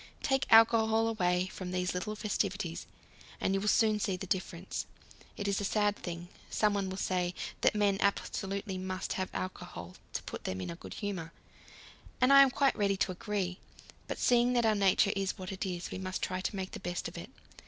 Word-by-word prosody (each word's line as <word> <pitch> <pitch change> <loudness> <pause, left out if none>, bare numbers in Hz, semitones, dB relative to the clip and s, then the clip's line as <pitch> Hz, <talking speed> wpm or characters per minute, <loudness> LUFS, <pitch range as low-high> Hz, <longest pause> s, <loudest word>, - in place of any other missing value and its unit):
Take 270 -1 +1
alcohol 225 0 +6
away 180 -5 +1
from 185 -1 -5
these 180 0 -1
little 210 +4 -3
festivities, 200 -4 -2 0.5
and 190 - +1
you 195 - +1
will 210 - -2
soon 215 0 +4
see 195 -2 0
the 195 - -6
difference. 185 -1 -3 0.5
It 205 - -3
is 200 0 +1
a - - -2
sad 205 0 +2
thing, 175 -2 -6 0.2
someone 205 -3 +1
will 190 - -5
say, 180 -2 0 0.3
that - - +4
men 205 -2 +3
absolutely 195 0 -1
must 185 0 -3
have 185 0 -2
alcohol 90 - -6 0.2
to - - -3
put - - -7
them 95 - -2
in 95 - -4
a - - -6
good - - -9
humour 180 -6 -4 0.9
and 255 +2 +5
I 275 - +10
am 275 - +7
quite 275 +1 +2
ready 200 -1 +1
to 190 - +1
agree. 185 -1 -3 0.5
But - - -3
seeing 245 0 +4
that 240 -2 +3
our 220 - +4
nature 200 0 +3
is 195 -1 -1
what 185 0 -6
it 195 +1 -3
is, 175 -1 -4
we - - -4
must 185 0 -4
try 185 0 -1
to 195 - -2
make 190 -1 -4
the - - -6
best 175 -1 -3
of - - -9
it. - - -7
195 Hz, 205 wpm, -32 LUFS, 185-210 Hz, 0.9 s, I